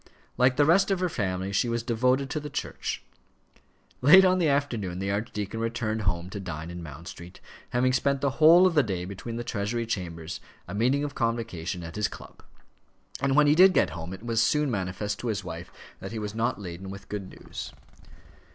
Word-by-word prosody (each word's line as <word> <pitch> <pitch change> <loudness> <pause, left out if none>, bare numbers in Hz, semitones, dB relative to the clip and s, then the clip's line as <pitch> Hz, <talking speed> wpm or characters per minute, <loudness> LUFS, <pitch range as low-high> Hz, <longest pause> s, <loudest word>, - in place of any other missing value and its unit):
Like 125 +1 +4
the 145 +2 +4
rest 190 +6 +4
of 195 -2 +1
her 180 -1 0
family 95 - -2
she 120 +4 +2
was 115 0 -1
devoted 125 +3 +1
to 155 - -1
the 150 0 -7
Church. - - -4 1.0
Late 185 +9 +8
on 185 0 +4
that 170 - +3
afternoon 120 -11 0
the 95 +1 -2
archdeacon 105 +1 -3
returned 115 -1 -1
home 90 -3 -1
to 100 - -5
dine 85 -3 -6
in 85 0 -7
Mount 80 +2 -9
Street, 90 -1 -10 0.3
having 130 +1 +2
spent 140 +2 +1
the 140 0 +1
whole 170 +4 +8
of 185 - +3
the 150 - +5
day 95 -7 -3
between 100 +5 -6
the 120 - -3
Treasury 115 +2 -2
chambers, 85 -5 -4 0.3
a 90 - -6
meeting 125 +7 +2
of 145 -1 -3
Convocation, 115 -9 -2
and 80 0 -8
his 105 -1 +1
club. - - -12 0.8
And 135 0 +1
when 150 +1 +6
he 145 - +5
did 185 +4 +7
get - - +3
home 80 +2 -6
it 95 +5 -8
was 115 -1 +1
soon 150 +2 +2
manifest 100 0 -3
to 120 - -4
his 105 -3 -1
wife 85 +1 -7 0.3
that - - -7
he 115 - -5
was 105 -1 -4
not 115 -2 -1
laden 95 0 -7
with 100 0 -9
good 100 -3 -5
news. - - -7
110 Hz, 205 wpm, -27 LUFS, 95-135 Hz, 1.0 s, Late